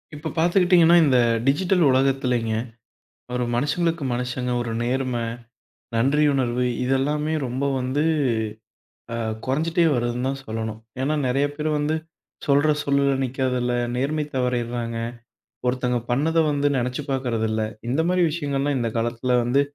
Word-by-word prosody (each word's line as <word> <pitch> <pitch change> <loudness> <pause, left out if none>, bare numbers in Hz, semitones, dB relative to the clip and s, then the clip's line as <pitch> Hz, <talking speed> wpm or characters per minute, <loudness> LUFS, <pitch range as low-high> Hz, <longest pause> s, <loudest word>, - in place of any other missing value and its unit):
இப்போ 150 - -5
பாத்துக்கிட்டீங்கன்னா 175 0 +5
இந்த 130 -3 +4 0.3
டிஜிட்டல் 180 +5 +3
உலகத்துலிங்க, 130 -3 +1 0.8
ஒரு 125 - 0
மனுஷங்களுக்கு 165 +4 0
மனுஷங்க 125 0 -2
ஒரு 120 -1 -3
நேர்மை, 125 -1 -1 0.7
நன்றியுணர்வு 130 -1 +2 0.2
இதெல்லாமே 145 +4 0
ரொம்ப 130 +3 -2
வந்து, 130 +4 0 1.1
ஆ - - -2 0.3
குறைஞ்சுட்டே 165 +6 +1
வருதுன்னுதான் 125 +3 -1
சொல்லணும். 110 0 -4 0.2
ஏன்னா 140 +4 +1
நிறைய 135 +3 +2
பேர் 155 +1 -1
வந்து 150 +2 0 0.5
சொல்ற 145 +2 +4
சொல்லுல 140 0 +2
நிக்கறதில்ல, 125 -1 -1 0.2
நேர்மை 150 +4 0
தவறீர்றாங்க. 120 -2 -1 0.7
ஒருத்தங்க 125 0 0
பண்ணத 155 +6 +1
வந்து 145 0 +1
நினைச்சு 125 +3 -2
பாக்கறது 125 -4 -1
இல்ல. 110 0 -1 0.3
இந்த 135 +6 +1
மாரி 180 0 +2
விஷயங்கல்லாம் 145 -3 -1
இந்த 115 - 0
காலத்துல 120 +2 0
வந்து 125 +4 +3
130 Hz, 120 wpm, -23 LUFS, 125-150 Hz, 1.1 s, பாத்துக்கிட்டீங்கன்னா